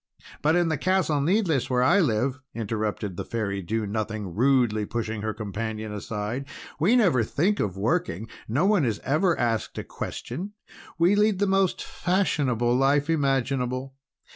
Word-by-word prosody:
"But 155 +2 +3
in 175 -1 +2
the 160 -4 -1
Castle 175 -5 +1
Needless, 165 - +1
where 125 -1 +2
I 175 +9 +5
live," 130 - +1 0.2
interrupted 105 -4 -3
the - - -3
Fairy 100 -4 -3
Do 110 +4 -2
Nothing, 105 -2 -3
rudely 120 -2 +2
pushing 110 0 -3
her 110 0 -1
companion 110 +1 -4
aside, 105 +5 -4 0.3
"we 190 +11 +4
never 180 - +4
think 175 - 0
of 95 -2 -1
working. 110 - -1 0.2
No 140 - +1
one 200 -5 +3
is 115 -5 0
ever 165 +5 +2
asked 115 -2 -1
a - - -3
question. 200 +5 -6 0.4
We 170 +4 +4
lead 210 -1 +3
the 205 - +2
most 195 -1 +1
fashionable 135 - 0
life 140 +4 +2
imaginable. 135 -3 0
130 Hz, 155 wpm, -26 LUFS, 110-165 Hz, 0.4 s, I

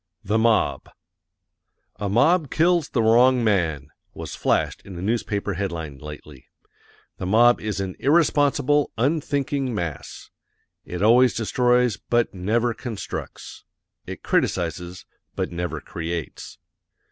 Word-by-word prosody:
THE 105 +3 +1
MOB 115 0 +1 1.1
"A 100 - -3
MOB 150 - +3
KILLS 170 0 +2
THE 115 - 0
WRONG 120 +2 +4
MAN" 80 -10 0 0.3
was - - -7
flashed - - 0
in 95 -3 -10
a - - -6
newspaper 105 -2 -1
headline 85 -7 -5
lately. 75 -3 -11 0.7
The 90 - -4
mob 120 +4 +4
is 105 -2 -3
an 95 -2 -4
IRRESPONSIBLE, 145 -1 +2
UNTHINKING 140 -1 -1
MASS. 85 -7 -6 0.5
It 90 +2 -4
always 125 +3 +5
destroys 125 +1 +2
BUT 120 -1 0
NEVER 115 +6 0
CONSTRUCTS. 115 -2 -7 0.4
It - - -8
criticises 90 +1 -1 0.3
BUT - - -3
NEVER 90 0 -4
CREATES. 85 -3 -6
110 Hz, 115 wpm, -23 LUFS, 90-130 Hz, 1.1 s, always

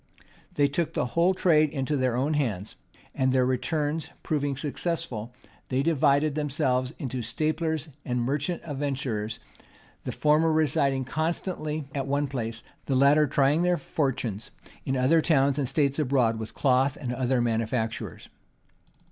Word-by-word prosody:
They 145 -1 +4
took 160 +3 -2
the - - +1
whole 175 +3 +3
trade 155 -4 +4
into 140 +1 -2
their 130 -3 +1
own 140 +5 +1
hands; 110 -9 -2 0.4
and 130 0 +1
their 130 -1 +3
returns 150 +4 -1
proving 145 -3 -1
successful, 145 -5 -3 0.4
they 130 +1 +1
divided 150 -1 +3
themselves 135 -4 0
into 130 -2 -4
staplers 155 +5 -1
and 125 -1 -1
merchant 145 +7 -1
adventurers; 135 -7 -3 0.7
the - - -3
former 155 +2 +3
residing 140 -4 +1
constantly 155 0 -2
at 135 -1 -2
one 140 +1 +1
place, 115 -5 -4 0.2
the 135 - +1
latter 145 +3 +5
trying 140 +4 +3
their 180 0 +2
fortunes 120 - -2 0.4
in 135 0 0
other 145 +6 +4
towns 140 -3 +2
and 135 -3 -1
states 140 -1 +1
abroad 125 -6 +2
with 110 -1 -7
cloth 135 0 +2
and 125 -3 -3
other 130 0 +1
manufactures. 115 -1 -2
140 Hz, 140 wpm, -27 LUFS, 125-155 Hz, 0.7 s, latter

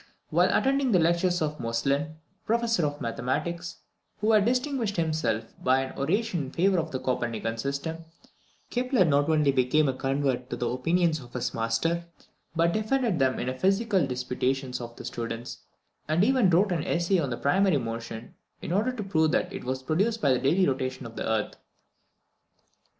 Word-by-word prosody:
While - - +4
attending 270 -1 +2
the - - +6
lectures 170 +1 +2
of 150 0 -3
Moestlin, 140 +6 -1 0.3
professor 230 -7 +2
of 145 0 -6
mathematics, 150 +9 -3 0.4
who 215 +2 +2
had 210 -2 +5
distinguished 250 -3 0
himself 155 -9 -1
by 130 +1 +3
an 135 0 -6
oration 175 +2 0
in - - -7
favour 185 +3 +2
of 160 0 -2
the 130 - -3
Copernican 115 -3 -2
system, 140 +6 -3 0.7
Kepler 250 -4 +2
not 145 0 +2
only 150 -3 +3
became 135 +3 +2
a 135 - +1
convert 135 -1 -1
to - - -3
the 120 - -2
opinions 165 +5 +1
of 125 -3 -13
his 125 - -2
master, 115 +10 0 0.5
but 170 +1 +2
defended 220 - 0
them 130 -1 +2
in - - -2
the 130 - -1
physical 195 - +1
disputations 125 0 -2
of 120 0 -8
the - - -9
students, 115 0 -5 0.5
and 155 +4 +2
even 250 -4 +4
wrote 185 +4 +3
an 165 -4 0
essay 175 +2 +1
on 145 -5 -1
the 120 - -3
primary 185 +2 +3
motion, 115 -1 -6 0.3
in - - -6
order 210 +7 +1
to 240 -4 -5
prove 160 -5 +2
that - - 0
it - - -6
was 130 +1 -3
produced 200 - +1
by 140 -7 +3
the 125 - +1
daily 170 +8 +3
rotation 130 -1 -2
of 115 -1 -9
the - - -3
earth. 110 -1 -1
155 Hz, 175 wpm, -27 LUFS, 130-190 Hz, 0.7 s, the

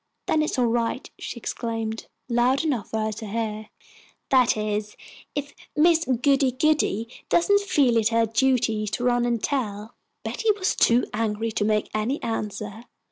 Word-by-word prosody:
"Then 310 - +2
it - - +2
is - - -3
all 250 - +3
right," 235 +2 -1
she - - -6
exclaimed, 225 -1 -4 0.2
loud 245 +3 +2
enough 255 -9 -1
for 220 - -2
her 215 0 -1
to 215 +1 -7
hear, 215 0 -3 0.6
"that 255 -4 +4
is, 210 0 -2 0.4
if 290 0 -4 0.2
Miss 330 +2 +4
Goody 265 +1 +2
goody 280 -6 +1 0.2
doesn't 405 +4 +4
feel 280 - +2
it 220 -1 +3
her 230 0 +3
duty 225 -2 +1
to 240 - -3
run 245 -1 +2
and 235 -2 -1
tell." 220 -5 -2 0.3
Betty 450 - -2
was 375 -2 0
too 240 +2 +4
angry 225 0 -1
to 210 - -1
make 215 0 0
any 220 +7 -1
answer. 215 0 -4
235 Hz, 165 wpm, -24 LUFS, 215-265 Hz, 0.6 s, that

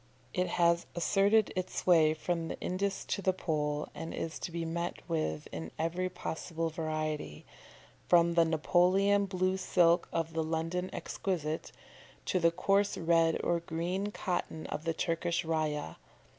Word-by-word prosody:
It 180 0 +1
has 170 0 +2
asserted 200 +5 +3
its 185 0 -3
sway 160 -3 +4
from 165 +1 -2
Indus 195 +2 -2
to 200 - -2
the 185 -1 +2
Pole, 150 -4 -1
and 165 - -6
is 160 - -4
to - - -5
be 170 0 -3
met 170 +1 -4
with 115 - -2
in 80 0 -5
every 175 +3 -1
possible 165 -1 -4
variety, 155 - -3 0.6
from 170 -1 +5
the 170 0 +5
Napoleon 185 +5 +3
blue 185 0 0
silk 175 -2 +3
of 165 0 -2
the 165 - 0
London 165 +3 -2
exquisite, 160 -5 -3 0.5
to 185 - +1
the 170 -1 +5
coarse 195 +4 +1
red 165 -1 +3
or 170 0 +2
green 175 +5 -2
cotton 175 -5 -3
of 155 - -5
the 165 - +1
Turkish 170 0 -1
rayah. 155 - -1
170 Hz, 145 wpm, -31 LUFS, 160-185 Hz, 0.6 s, from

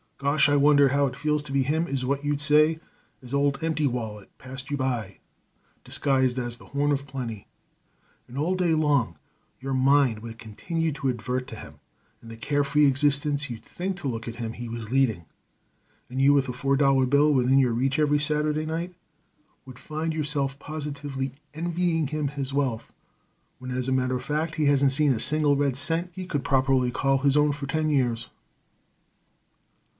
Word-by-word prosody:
'Gosh! 140 +1 +2
I 145 - +3
wonder 145 -1 +5
how 140 +1 +2
it 125 - -6
feels 150 +2 0
to 150 - -9
be 135 0 +2
him', 160 +5 0
is 135 -2 -2
what 140 +2 -1
you'd 145 0 -1
say 155 +2 +4 0.4
as 125 +1 -10
old 140 +1 +1
Empty 160 -2 0
Wallet 110 -5 -5
passed 130 +1 -9
you 145 - -1
by 120 -7 -2 0.7
disguised 130 -2 +1
as 120 -1 -4
the - - -16
Horn 145 +1 0
of 140 -1 -1
Plenty, 120 -6 -6 0.8
and 125 - -12
all 160 +6 +1
day 180 -3 +1
long 140 - +1 0.4
your 135 +1 -4
mind 130 -3 +3
would 115 0 -9
continue 160 +10 -3
to 140 -2 -2
advert 125 +1 -2
to - - -8
him - - -11 0.4
and 115 - -12
the 115 - -8
carefree 145 +4 +2
existence 145 +1 +1
you'd 115 -2 -7
think 185 +8 -4
to 165 -7 -4
look 115 -3 -4
at 115 - -5
him 115 -1 -4
he 120 0 -7
was 115 -1 -6
leading; 125 -10 +1 0.8
and 130 +2 -2
you, 140 +1 +6
with 135 -2 +2
a - - -3
four 135 +2 0
dollar 135 -2 +3
bill 145 +3 +4
within 130 -1 +3
your 125 -3 +3
reach 135 +3 0
every 150 -1 +3
Saturday 150 0 0
night, 165 +3 -3 0.7
would 130 -2 -12
find 160 +1 -3
yourself 145 -3 -2
positively 140 -3 -5 0.2
envying 170 -1 0
him 150 0 -2
his 140 -1 -5
wealth, 135 -5 -1 0.7
when, 130 - -8
as 125 0 -2
a - - 0
matter 130 -1 +1
of 125 - -4
fact, 155 +4 -2
he 155 - +1
hasn't 140 -1 +4
seen 145 -1 +3
a 115 - -3
single 145 +2 +2
red 140 -2 +1
cent 165 +6 -2
he 185 +1 -6
could 145 -6 -2
properly 130 -2 +2
call 135 +2 +1
his 140 +1 +2
own 150 0 +4
for 140 0 -5
ten 155 +2 0
years." 120 -5 0
140 Hz, 190 wpm, -26 LUFS, 130-150 Hz, 0.8 s, you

